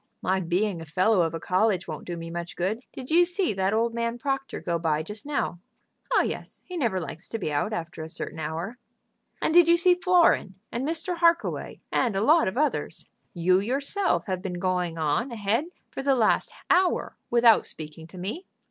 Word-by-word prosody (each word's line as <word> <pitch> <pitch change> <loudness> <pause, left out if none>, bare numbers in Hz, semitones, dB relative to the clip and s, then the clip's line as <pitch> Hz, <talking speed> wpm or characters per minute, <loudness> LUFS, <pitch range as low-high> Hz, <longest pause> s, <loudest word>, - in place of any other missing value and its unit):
"My 190 +1 +2
being 180 +1 0
a - - -7
fellow 185 +5 +3
of 165 -1 0
a - - -3
college 185 +2 +1
won't 155 -3 -7
do 175 -1 -4
me 165 0 -7
much 170 0 -5
good. 195 +7 -1
Did 260 +2 -8
you 345 +2 +7
see 355 - 0
that 190 0 0
old 230 +2 +1
man 235 0 -2
Proctor 270 +2 -3
go 170 -1 -2
by 155 -2 0
just 210 - -7
now?" 285 -11 -1 0.5
"Oh - - +4
yes; - - -6
he 365 - -8
never 235 - 0
likes 165 -2 -7
to 225 - -3
be 180 -8 -3
out 145 +9 0
after 170 -5 -5
a 160 - -6
certain 160 -1 -6
hour." 160 +7 -3 0.7
"And 315 - +1
did 345 -1 +7
you 340 0 +6
see 360 +1 +5
Florin, 355 - +3 0.2
and 250 +4 -2
Mr. 335 +2 -1
Harkaway, 335 0 +1
and 235 -6 +1
a 195 - +1
lot 315 +6 +5
of 190 - -3
others? 300 +1 -1 0.3
You 180 +2 +3
yourself 280 - 0
have 185 -2 -2
been 180 -2 -4
going 180 -2 -1
on 160 - 0
ahead 225 +5 0 0.3
for - - -4
the 275 0 +3
last 225 -4 +2 0.2
hour 365 0 +2
without 235 -2 +5
speaking 155 +1 -8
to 185 - -13
me." 215 - -5
210 Hz, 200 wpm, -26 LUFS, 175-275 Hz, 0.7 s, you